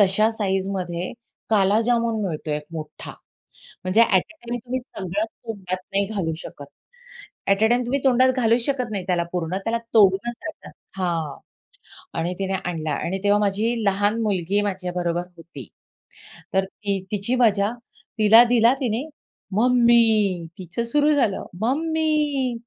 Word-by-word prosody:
तश्या 205 Hz, +3 st, +4 dB
साइझमध्ये 190 Hz, -4 st, -2 dB, 0.4 s
काला 205 Hz, 0 st, +4 dB
जामून 235 Hz, -2 st, +1 dB
मिळतो 155 Hz, -3 st, -4 dB
एक 150 Hz, 0 st, -2 dB
मोठा. 155 Hz, -2 st, -7 dB, 0.7 s
म्हणजे 185 Hz, +5 st, +3 dB
ॲट 195 Hz, -6 st, +4 dB
अ -, -, -26 dB
टाईम 240 Hz, -, -2 dB
तुम्ही 255 Hz, +1 st, -2 dB
सगळं 200 Hz, -4 st, -4 dB
तोंडात 205 Hz, -5 st, -6 dB, 0.2 s
नाही 200 Hz, 0 st, +2 dB
घालू 195 Hz, -6 st, -2 dB
शकत, 145 Hz, -3 st, -8 dB, 0.8 s
ॲट 195 Hz, +2 st, +3 dB
अ 220 Hz, -, +6 dB
टाईम 240 Hz, +2 st, +2 dB
तुम्ही 275 Hz, +3 st, 0 dB
तोंडात 260 Hz, 0 st, +5 dB
घालूच 230 Hz, 0 st, +2 dB
शकत 255 Hz, -5 st, -1 dB
नाही 195 Hz, -3 st, -3 dB
त्याला 175 Hz, -2 st, +1 dB
पूर्ण, 180 Hz, 0 st, -2 dB
त्याला 230 Hz, +1 st, +1 dB, 0.2 s
तोडूनच 205 Hz, +2 st, +4 dB
खायचा 315 Hz, -, -8 dB, 0.3 s
हां. 165 Hz, -5 st, -1 dB, 0.8 s
आणि 175 Hz, +2 st, -1 dB
तिने 195 Hz, 0 st, -2 dB
आणला 160 Hz, -3 st, -3 dB
आणि 180 Hz, +7 st, -2 dB
तेव्हा 205 Hz, 0 st, +4 dB
माझी 210 Hz, +4 st, +1 dB
लहान 205 Hz, +3 st, +1 dB
मुलगी 200 Hz, -1 st, +1 dB
माझ्याबरोबर 180 Hz, -3 st, -2 dB
होती. 155 Hz, -, -11 dB, 0.9 s
तर 190 Hz, -, +3 dB
ती 200 Hz, 0 st, -3 dB
तिची 210 Hz, +5 st, -1 dB
मजा. 215 Hz, -3 st, +3 dB, 0.5 s
तिला 220 Hz, +2 st, +8 dB
दिला 235 Hz, 0 st, +4 dB
तिने. 240 Hz, -1 st, -1 dB, 0.5 s
"मम्मी," 225 Hz, -7 st, +3 dB
तिचं 185 Hz, +5 st, -4 dB
सुरु 295 Hz, +5 st, +2 dB
झालं. 225 Hz, -9 st, +1 dB, 0.2 s
"मम्मी, 300 Hz, 0 st, 0 dB
205 Hz, 140 wpm, -23 LUFS, 185-235 Hz, 0.9 s, तिला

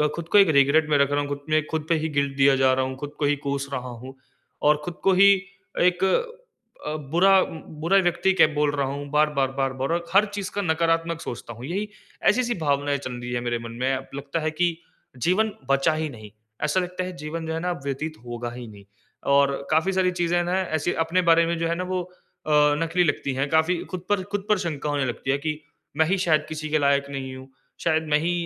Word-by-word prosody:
खुद 170 Hz, -1 st, -6 dB
को 205 Hz, -, +6 dB
एक 195 Hz, -4 st, +7 dB
रिग्रेट 145 Hz, +3 st, +4 dB
में 145 Hz, -, +4 dB
रख 140 Hz, 0 st, +2 dB
रहा 145 Hz, -, +1 dB
हूँ 145 Hz, -, -3 dB
खुद 145 Hz, -, -3 dB
मे 155 Hz, 0 st, +3 dB
खुद 155 Hz, -1 st, -2 dB
पे 165 Hz, -, +4 dB
ही 160 Hz, -, -1 dB
गिल्ट 140 Hz, -2 st, -1 dB
दिया 135 Hz, 0 st, +5 dB
जा 130 Hz, 0 st, +4 dB
रहा 130 Hz, 0 st, +1 dB
हूँ, 130 Hz, -, -5 dB
खुद 145 Hz, +1 st, -7 dB
को 150 Hz, -, +1 dB
ही 145 Hz, 0 st, +3 dB
कोस 140 Hz, 0 st, -2 dB
रहा 125 Hz, -1 st, -4 dB
हूँ। 125 Hz, +2 st, -10 dB, 0.5 s
और 150 Hz, 0 st, +4 dB
खुद 175 Hz, -, -5 dB
को 195 Hz, -, +4 dB
ही 200 Hz, +2 st, +7 dB, 0.5 s
एक 180 Hz, +1 st, +3 dB, 0.8 s
अ, 150 Hz, -, -2 dB, 0.2 s
बुरा 190 Hz, +2 st, +5 dB, 0.4 s
बुरा 195 Hz, +4 st, +4 dB
व्यक्ति 175 Hz, +2 st, +2 dB
कै -, -, +6 dB
बोल 150 Hz, 0 st, +2 dB
रहा 140 Hz, -1 st, 0 dB
हूँ, 140 Hz, +1 st, -5 dB
बार-बार, 150 Hz, -3 st, +2 dB
बार-बार। 135 Hz, 0 st, -2 dB
और 170 Hz, 0 st, -2 dB
हर 200 Hz, +2 st, +6 dB
चीज़ 200 Hz, 0 st, -4 dB
का 205 Hz, -, 0 dB
नकारात्मक 165 Hz, -1 st, 0 dB
सोचता 120 Hz, 0 st, -7 dB
हूँ। 120 Hz, +3 st, -9 dB
यही 195 Hz, +7 st, -3 dB, 0.4 s
ऐसी-ऐसी 245 Hz, -1 st, +3 dB
भावनाएँ 145 Hz, -1 st, 0 dB
चल 130 Hz, -2 st, -6 dB
रही 120 Hz, 0 st, -6 dB
है 120 Hz, -, 0 dB
मेरे 120 Hz, -1 st, -2 dB
मन 115 Hz, 0 st, -8 dB
में। 135 Hz, +1 st, +1 dB
अब 135 Hz, 0 st, -5 dB
लगता 140 Hz, +3 st, -3 dB
है 155 Hz, -, -1 dB
कि 170 Hz, +1 st, 0 dB, 0.5 s
जीवन 215 Hz, +5 st, +2 dB, 0.2 s
बचा 140 Hz, +3 st, +3 dB
ही 155 Hz, 0 st, -2 dB
नहीं। 110 Hz, -5 st, -11 dB, 0.3 s
ऐसा 150 Hz, +5 st, +2 dB
लगता 180 Hz, 0 st, -3 dB
है 185 Hz, -, -6 dB
जीवन 160 Hz, +2 st, -5 dB
जो 160 Hz, -, -2 dB
है 160 Hz, -, -2 dB
ना 180 Hz, +1 st, -1 dB
व्यतीत 155 Hz, +3 st, -4 dB
होगा 120 Hz, 0 st, -5 dB
ही 120 Hz, -1 st, -8 dB
नहीं। 100 Hz, -2 st, -14 dB, 0.5 s
और 140 Hz, 0 st, +4 dB, 0.2 s
काफ़ी 160 Hz, +5 st, +2 dB
सारी 185 Hz, -1 st, +2 dB
चीज़ें 175 Hz, 0 st, 0 dB
ना 180 Hz, +2 st, 0 dB
ऐसे 165 Hz, -1 st, -1 dB
अपने 180 Hz, +3 st, +1 dB
बारे 165 Hz, 0 st, +5 dB
में 170 Hz, 0 st, -1 dB
जो 165 Hz, -, 0 dB
है 170 Hz, -, 0 dB
ना 180 Hz, -, -3 dB
वो 185 Hz, -, 0 dB, 0.5 s
अ, -, -, 0 dB, 0.3 s
नकली 175 Hz, +2 st, +1 dB
लगती 140 Hz, -3 st, -1 dB
है। 135 Hz, +2 st, -1 dB
काफ़ी 160 Hz, +4 st, +2 dB
खुद 180 Hz, -1 st, -6 dB
पर 200 Hz, -2 st, +1 dB
खुद 205 Hz, -1 st, -2 dB
पर 210 Hz, -, +4 dB
शंका 150 Hz, -5 st, -3 dB
होने 145 Hz, -2 st, 0 dB
लगती 125 Hz, +2 st, -2 dB
है 140 Hz, -, +2 dB
कि 155 Hz, +1 st, -3 dB, 0.4 s
मैं 160 Hz, -, +4 dB
ही 195 Hz, +3 st, +1 dB
शायद 165 Hz, -4 st, +2 dB
किसी 155 Hz, -1 st, -5 dB
के 155 Hz, 0 st, +2 dB
लायक 140 Hz, 0 st, +2 dB
नहीं 130 Hz, -1 st, -5 dB
हूँ। 130 Hz, +1 st, -11 dB, 0.3 s
शायद 160 Hz, -1 st, +2 dB
मैं 150 Hz, -, +3 dB
ही 165 Hz, +3 st, 0 dB
155 Hz, 235 wpm, -24 LUFS, 140-175 Hz, 0.8 s, एक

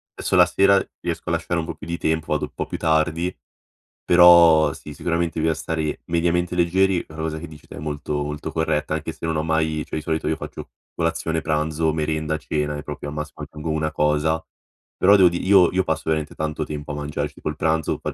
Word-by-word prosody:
esso -, -, -1 dB
la -, -, +8 dB
sera 100 Hz, 0 st, +4 dB, 0.2 s
riesco -, -, -4 dB
a -, -, 0 dB
lasciare 85 Hz, +1 st, -1 dB
un 80 Hz, -, -3 dB
po' -, -, -5 dB
più 75 Hz, -, -11 dB
di 85 Hz, 0 st, -3 dB
tempo, 80 Hz, 0 st, -1 dB
vado 75 Hz, -, -1 dB
po' -, -, -5 dB
più -, -, -5 dB
tardi 80 Hz, +3 st, +1 dB, 0.7 s
però 85 Hz, -3 st, +7 dB
sì, 75 Hz, -, -10 dB
sicuramente 85 Hz, +1 st, -1 dB
bisogna 80 Hz, 0 st, +2 dB
stare 80 Hz, -2 st, -3 dB
mediamente 85 Hz, +1 st, 0 dB
leggeri, 90 Hz, +1 st, +2 dB
è -, -, -15 dB
una 80 Hz, 0 st, -5 dB
cosa 80 Hz, 0 st, -3 dB
che, 85 Hz, -, -7 dB
dici 75 Hz, -1 st, -14 dB
te, -, -, -10 dB
è -, -, -6 dB
molto 75 Hz, 0 st, -3 dB
molto 75 Hz, +1 st, -5 dB
corretta 75 Hz, -1 st, -1 dB
anche 80 Hz, +1 st, -4 dB
se 80 Hz, -, -8 dB
non 80 Hz, -1 st, -1 dB
ho -, -, +1 dB
mai 80 Hz, -1 st, 0 dB
cioè, -, -, -6 dB
di -, -, -3 dB
solito 80 Hz, -1 st, -2 dB
io 80 Hz, -, +1 dB
faccio -, -, -8 dB, 0.3 s
colazione, 80 Hz, -1 st, -1 dB
pranzo, 80 Hz, +1 st, 0 dB
merenda, 80 Hz, 0 st, -1 dB
cena 75 Hz, -1 st, -2 dB
e 75 Hz, -, -7 dB
proprio, 75 Hz, -1 st, -6 dB
al 75 Hz, -, -7 dB
massimo, 75 Hz, -1 st, -6 dB
aggiungo 75 Hz, +1 st, -5 dB
una 80 Hz, 0 st, -1 dB
cosa. 75 Hz, +1 st, +1 dB, 0.6 s
Però, 100 Hz, +2 st, +6 dB
devo 95 Hz, -2 st, +7 dB
di 85 Hz, -, -4 dB
io 95 Hz, -3 st, +6 dB
io 95 Hz, +1 st, +1 dB
passo 80 Hz, -, -2 dB
veramente 80 Hz, -1 st, -1 dB
tanto 75 Hz, 0 st, -3 dB
tempo 75 Hz, -1 st, -6 dB
a -, -, -4 dB
mangiare 75 Hz, 0 st, -3 dB
ci 75 Hz, -, -22 dB
tipo, -, -, -4 dB
il -, -, -4 dB
pranzo 80 Hz, -1 st, 0 dB
80 Hz, 225 wpm, -22 LUFS, 75-85 Hz, 0.7 s, la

